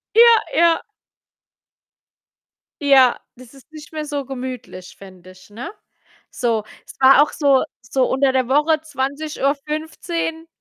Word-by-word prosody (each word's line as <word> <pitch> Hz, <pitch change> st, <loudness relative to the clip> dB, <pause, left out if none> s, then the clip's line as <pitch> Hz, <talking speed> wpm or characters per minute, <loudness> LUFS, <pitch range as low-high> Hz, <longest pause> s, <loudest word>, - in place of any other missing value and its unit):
Ja, 465 Hz, -1 st, +7 dB, 0.2 s
ja. 335 Hz, -1 st, +3 dB, 2.0 s
Ja, 265 Hz, -3 st, +5 dB, 0.2 s
das 255 Hz, +1 st, -16 dB
ist 270 Hz, +3 st, -19 dB
nicht 305 Hz, 0 st, -12 dB
mehr 305 Hz, -1 st, -4 dB
so 290 Hz, -2 st, -4 dB
gemütlich, 250 Hz, -7 st, -8 dB
finde 185 Hz, -2 st, -14 dB
ich, 185 Hz, -, -19 dB
ne? 245 Hz, -, -8 dB, 0.6 s
So, 230 Hz, -4 st, -1 dB, 0.2 s
es -, -, -13 dB
war 270 Hz, +2 st, +7 dB
auch 300 Hz, -, -1 dB
so 280 Hz, -3 st, +2 dB, 0.2 s
so 255 Hz, +2 st, 0 dB
unter 265 Hz, 0 st, +2 dB
der 260 Hz, -2 st, +1 dB
Woche 300 Hz, +3 st, +2 dB
20:15 305 Hz, +3 st, -3 dB
275 Hz, 125 wpm, -20 LUFS, 255-310 Hz, 2.0 s, Ja